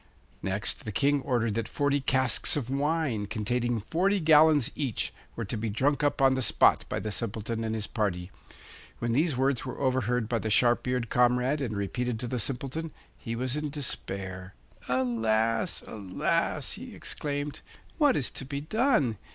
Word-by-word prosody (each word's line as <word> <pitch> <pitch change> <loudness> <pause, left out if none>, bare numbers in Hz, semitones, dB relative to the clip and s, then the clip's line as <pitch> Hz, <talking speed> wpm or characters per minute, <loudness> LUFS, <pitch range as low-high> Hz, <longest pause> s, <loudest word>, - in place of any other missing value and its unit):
Next, 95 +2 -1
the 110 - -4
King 140 +7 +2
ordered 120 -5 0
that 115 +1 -2
forty 145 +1 +1
casks 130 -1 +2
of 130 -3 -3
wine, 140 -6 0
containing 120 +3 -1
forty 185 - +1
gallons 155 -4 +5
each, 135 -7 -2 0.2
were 115 - -3
to 100 - -4
be 110 0 -2
drunk 140 +7 +1
up 145 -1 +1
on 135 0 +6
the 130 - 0
spot - - +4
by - - -1
the 105 - -4
Simpleton 115 +1 -3
and 110 0 -2
his 110 -1 -2
party. 95 -6 -2 0.7
When 120 0 -2
these 145 +2 +2
words 135 -1 +1
were - - -6
overheard 125 -3 +1
by 115 0 0
the 110 - -3
sharp 120 +3 +3
eared 125 -2 -1
comrade 125 +4 +3
and 110 -6 -2
repeated 120 +4 -2
to 125 - -2
the 125 +1 -2
Simpleton, 135 +7 -2 0.3
he 115 -2 -5
was 130 +2 -1
in 150 0 -2
despair. 95 -9 -4 0.3
'Alas, 115 -3 +1
alas!' 100 -4 -1
he - - -8
exclaimed; 145 0 -4 0.4
'what 290 -4 +5
is 130 - -1
to - - -5
be 140 +1 -4
done? 155 - +1
125 Hz, 170 wpm, -28 LUFS, 110-140 Hz, 0.7 s, on